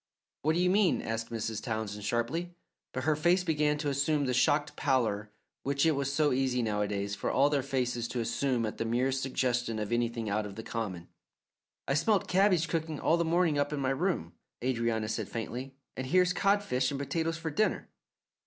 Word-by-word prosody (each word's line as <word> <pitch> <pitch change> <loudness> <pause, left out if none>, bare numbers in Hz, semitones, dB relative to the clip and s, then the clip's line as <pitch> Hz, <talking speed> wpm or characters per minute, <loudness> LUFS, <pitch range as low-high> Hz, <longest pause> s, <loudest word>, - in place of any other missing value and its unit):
"What 155 +2 +2
do - - +1
you 180 0 +3
mean?" 200 -2 +3
asked 115 0 -3
Mrs. 110 -1 -3
Townsend 110 -3 -4
sharply, 140 +12 -1 0.4
but 130 - -4
her 155 - +3
own 155 0 -1
face 180 +3 +4
began 150 -3 +1
to 150 0 -3
assume 140 +1 +1
the 125 - 0
shocked 145 +4 +2
pallour 110 -7 0 0.3
which 140 +1 +1
it 160 - +5
was 140 -2 -1
so 150 0 +2
easy 125 -1 +1
nowadays 105 -2 -1
for 100 - -2
all 140 +2 +3
their 145 -2 +2
faces 125 -3 -1
to 125 - -3
assume 120 +1 0
at 110 - -5
the - - +1
merest 130 +4 0
suggestion 125 -3 0
of 105 0 -3
anything 120 -1 0
out 105 +1 -1
of 100 - -9
the 110 - -6
common. 100 -8 -4 0.8
"I 140 - +1
smelt 195 +7 +2
cabbage 185 -3 +3
cooking 160 -3 -2
all 165 - +3
the 170 - +1
morning 165 -2 +2
up 145 +1 0
in 150 - -2
my 135 -1 +1
room," 135 - -1 0.3
Adrianna 115 -3 0
said 110 - -3
faintly, 125 +4 -5 0.2
"and 130 - -4
here's 180 +4 +3
codfish 195 -12 +2
and 140 - -3
potatoes 165 +4 -1
for 165 -1 -4
dinner." 215 +9 0
135 Hz, 200 wpm, -30 LUFS, 115-155 Hz, 0.8 s, it